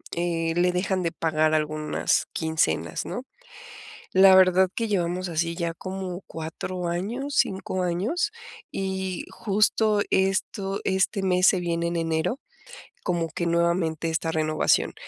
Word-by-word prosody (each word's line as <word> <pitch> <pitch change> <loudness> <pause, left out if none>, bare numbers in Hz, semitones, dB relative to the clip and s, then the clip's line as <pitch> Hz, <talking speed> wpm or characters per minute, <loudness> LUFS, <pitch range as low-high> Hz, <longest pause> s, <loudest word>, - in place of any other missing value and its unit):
eh, 165 -1 -1
le 180 +1 +3
dejan 185 +1 0
de 170 - 0
pagar 155 -1 +1
algunas 155 0 0
quincenas, 160 0 -1
¿no?, 245 - -5 0.9
la 190 0 +8
verdad 185 0 +5
que 230 - -1
llevamos 180 -2 -1
así 170 0 -1
ya 170 -1 -2
como 185 0 -5
4 165 +3 -5
años, 230 +12 -3
5 190 -4 0
años, 195 - 0 0.4
y 190 -1 -3
justo 210 0 +2
esto 195 +1 0
este 190 +1 +1
mes 185 -1 +3
se 185 - +4
viene 170 -1 -1
en 170 - -2
enero, 165 - -1 0.6
como 170 -3 -1
que 170 - -3
nuevamente 170 -1 +1
esta 160 0 -1
renovación, 155 -1 +1
180 Hz, 130 wpm, -25 LUFS, 165-190 Hz, 0.9 s, la